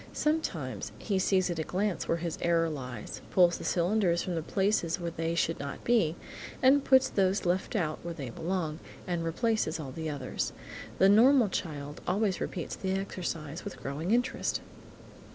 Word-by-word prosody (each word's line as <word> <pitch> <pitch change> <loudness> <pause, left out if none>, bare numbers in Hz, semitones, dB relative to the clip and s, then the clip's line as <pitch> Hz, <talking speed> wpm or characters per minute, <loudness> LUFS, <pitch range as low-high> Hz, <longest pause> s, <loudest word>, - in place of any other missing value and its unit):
Sometimes, 150 - -1
he 195 - -1
sees 185 -1 +2
at 170 - -3
a - - 0
glance 190 +3 -1
where 165 - +1
his 170 -1 -4
error 165 -1 +2
lies, 125 -7 -6
pulls 175 -2 +4
the - - -7
cylinders 175 -1 +2
from 180 - -3
the 165 - -1
places 190 -1 +1
where 170 -1 -3
they 165 +1 -2
should 165 -1 0
not 140 0 -6
be, 215 -10 +3 0.4
and 270 +2 +5
puts 260 -1 +5
those 195 0 +1
left 180 +5 0
out 155 -6 0
where 170 0 -5
they 135 -6 -6
belong, 160 0 -2 0.3
then 175 -2 -1
replaces 170 0 0
all 140 -4 -5
the 160 +3 -4
others. 140 -4 -3 0.4
The 190 - +6
normal 230 +3 +6
child 145 -5 -4
always 195 +1 +1
repeats 175 - -3
the 190 -1 -2
exercise 170 -5 -4
with 200 - -7
growing 145 +6 -4
interest. 245 +3 +1
175 Hz, 170 wpm, -30 LUFS, 160-195 Hz, 0.4 s, The